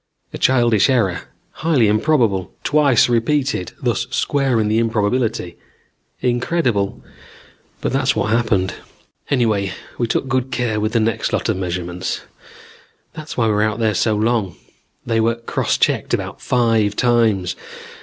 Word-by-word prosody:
A - - -6
childish 120 -4 +3
error, 110 -9 +1 0.4
highly 150 -9 +3
improbable; 105 - +1
twice 145 -5 +4
repeated, 125 -3 0
thus - - 0
squaring 130 -6 +1
the 110 +2 +2
improbability. 110 -4 -1 0.6
Incredible, 120 -4 0 0.8
but - - -2
that's - - +1
what 105 - 0
happened. 105 -5 +1 0.6
"Anyway, 110 -7 +1 0.3
we 120 - +1
took 130 - -1
good 130 0 0
care 120 -4 -1
with 110 +1 -1
the 115 - +3
next 110 -1 0
lot - - 0
of - - 0
measurements. 90 0 -3 0.9
That's 155 -1 -8
why 115 - +2
we 110 - +2
were 105 - +1
out 110 0 0
there 110 -2 +1
so 105 +3 +1
long. 110 -4 0 0.5
They 115 -1 0
were 115 +1 +2
cross 115 0 -1
checked - - +1
about - - -6
five 115 -4 +1
times. 115 -7 +2
115 Hz, 140 wpm, -19 LUFS, 105-125 Hz, 0.9 s, twice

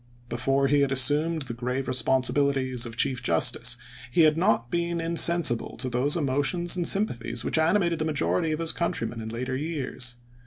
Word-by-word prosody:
Before 135 +4 0
he 145 +1 +2
had 140 -1 +1
assumed 145 +5 +1
the 125 -3 -6
grave 125 +3 -4
responsibilities 130 0 0
of 115 0 -9
chief 125 -1 +1
justice 120 0 +2 0.3
he 165 - +2
had 155 -1 +4
not 165 - 0
been 170 0 -2
insensible 165 -6 +3
to 130 -1 -4
those 135 +6 0
emotions 150 +5 0
and 175 -2 -1
sympathies 120 - 0
which - - 0
animated 170 0 +1
the 155 - -1
majority 145 - -1
of 155 - -1
his 165 0 0
countrymen 145 -8 -3
in 110 - -6
later 125 +3 -4
years. 130 -4 -4
135 Hz, 170 wpm, -25 LUFS, 125-165 Hz, 0.3 s, had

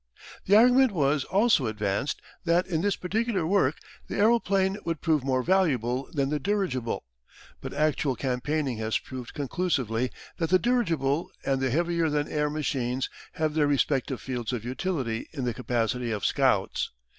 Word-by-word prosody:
The 200 - +6
argument 250 +1 +6
was 145 -3 +1
also 200 - +3
advanced 105 +4 -2 0.2
that, 175 +1 +2
in 160 -3 -1
this 200 +1 +1
particular 205 -1 -1
work, 160 -6 +2 0.3
the - - -4
aeroplane 200 -3 +2
would 165 -2 -2
prove 155 -5 +1
more 130 -1 +1
valuable 135 - +1
than 140 -5 0
the 150 0 0
dirigible, 165 - -1 0.6
but - - -6
actual 150 -2 +1
campaigning 130 +1 -1
has 110 0 0
proved 130 -2 -8
conclusively 130 - -1 0.3
that 165 -2 -1
the 185 - +6
dirigible 170 - 0 0.2
and 135 -1 +1
the 130 - +1
heavier 170 +3 +1
than 150 0 0
air 150 -1 0
machines 135 -4 -2 0.2
have 155 -1 -1
their 150 -2 +2
respective 135 -2 +1
fields 125 -3 -4
of 120 -3 -4
utility 130 -4 -2
in 140 -4 -4
the 120 -1 0
capacity 120 0 -1
of 105 -3 -2
scouts. - - +1
145 Hz, 155 wpm, -27 LUFS, 125-180 Hz, 0.6 s, The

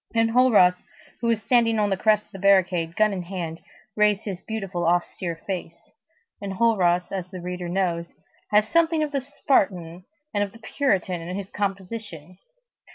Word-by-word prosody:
Enjolras, 225 -5 +4 0.4
who 235 - -2
was 230 -2 +1
standing 230 -3 +3
on 205 -1 +1
the - - +3
crest 210 +2 +2
of - - -32
the 195 - -9
barricade, 180 -4 +3
gun 215 -1 +3
in 185 - -3
hand, 170 -3 -5 0.4
raised 210 0 +3
his 190 -4 -5
beautiful, 195 -5 -4
austere 175 0 0
face. 170 -3 -6 0.5
Enjolras, 190 -3 +1
as 185 -2 -4
the 185 -1 -8
reader 180 0 -5
knows, 175 -2 -1 0.3
had 210 0 +5
something 325 +3 +2
of 300 - -3
the 280 -2 -1
Spartan 190 - 0 0.3
and 205 -1 +1
of 200 -1 -6
the - - -12
Puritan 195 - -1
in 180 +3 -5
his 200 -1 -7
composition. 195 -4 -5
195 Hz, 160 wpm, -24 LUFS, 180-220 Hz, 0.5 s, had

